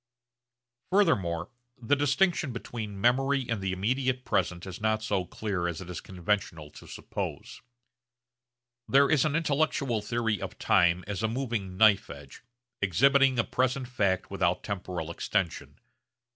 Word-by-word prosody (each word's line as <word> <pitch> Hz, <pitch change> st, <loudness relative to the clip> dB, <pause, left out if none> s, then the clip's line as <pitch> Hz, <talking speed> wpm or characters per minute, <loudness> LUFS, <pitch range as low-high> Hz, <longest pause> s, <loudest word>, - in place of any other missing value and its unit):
Furthermore 95 Hz, -, +1 dB, 0.3 s
the 120 Hz, +4 st, +1 dB
distinction 145 Hz, +2 st, +1 dB
between 110 Hz, -3 st, -6 dB
memory 135 Hz, +3 st, +2 dB
and 115 Hz, -4 st, -2 dB
the 95 Hz, -1 st, -1 dB
immediate 125 Hz, +7 st, -1 dB
present 90 Hz, -1 st, -1 dB
is 95 Hz, +1 st, -8 dB
not 110 Hz, 0 st, +1 dB
so 100 Hz, -4 st, 0 dB
clear 95 Hz, -3 st, -3 dB
as 85 Hz, -2 st, -4 dB
it 90 Hz, -1 st, -8 dB
is 90 Hz, -, -6 dB
conventional 90 Hz, -4 st, -3 dB
to -, -, -13 dB
suppose. -, -, -6 dB, 1.3 s
There 140 Hz, +1 st, +4 dB
is 155 Hz, -1 st, +4 dB
an 155 Hz, -1 st, 0 dB
intellectual 145 Hz, -7 st, 0 dB
theory 115 Hz, -2 st, -1 dB
of -, -, -6 dB
time 90 Hz, +1 st, +3 dB
as 100 Hz, -2 st, -4 dB
a 110 Hz, -, +1 dB
moving 115 Hz, -6 st, -3 dB
knife 105 Hz, 0 st, +5 dB
edge, 70 Hz, -1 st, -11 dB, 0.4 s
exhibiting 135 Hz, -, +4 dB
a 120 Hz, -, +3 dB
present 130 Hz, 0 st, -1 dB
fact 100 Hz, -7 st, 0 dB
without -, -, 0 dB
temporal 90 Hz, -4 st, -4 dB
extension. 95 Hz, 0 st, -2 dB
110 Hz, 140 wpm, -28 LUFS, 95-130 Hz, 1.3 s, knife